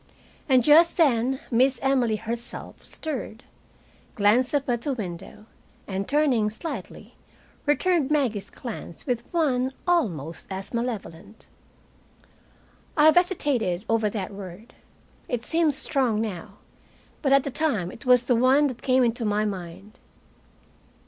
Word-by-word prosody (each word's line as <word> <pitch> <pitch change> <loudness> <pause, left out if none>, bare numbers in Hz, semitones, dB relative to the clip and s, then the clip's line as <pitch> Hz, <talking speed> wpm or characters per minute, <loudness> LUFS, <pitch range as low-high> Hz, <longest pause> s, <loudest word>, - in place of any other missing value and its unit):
And 255 -2 +5
just 320 +5 +5
then 265 -5 +2
Miss 255 +2 +3
Emily 255 -5 +2
herself 230 +2 -7
stirred, 260 -6 -6 0.7
glanced 230 +6 +3
up 280 -1 0
at 240 -2 0
the 280 +2 -2
window, 195 -1 -7 0.4
and 195 0 -3
turning 275 -8 +2
slightly, 270 +10 -7 0.5
returned 305 0 +2
Maggie's 235 -10 0
glance 225 -8 -8
with 245 -2 -3
one 265 -6 +1
almost 170 - -1
as 190 +3 -5
malevolent. 225 -4 -5 1.5
I 300 - +5
have 315 - +7
hesitated 275 - +1
over 225 -2 +1
that 200 -2 -5
word. 195 +3 -10 0.6
It 235 -2 -2
seems 320 -2 +1
strong 255 -7 0
now, 205 -7 -5 0.6
but 275 - +1
at 275 -1 +5
the 280 - -4
time 235 - -1
it 225 - -11
was 250 -1 +5
the 245 0 +2
one 260 +5 +4
that 250 - -8
came 260 -1 +3
into 235 0 0
my 210 0 +1
mind. 195 +3 -7
240 Hz, 130 wpm, -25 LUFS, 210-275 Hz, 1.5 s, have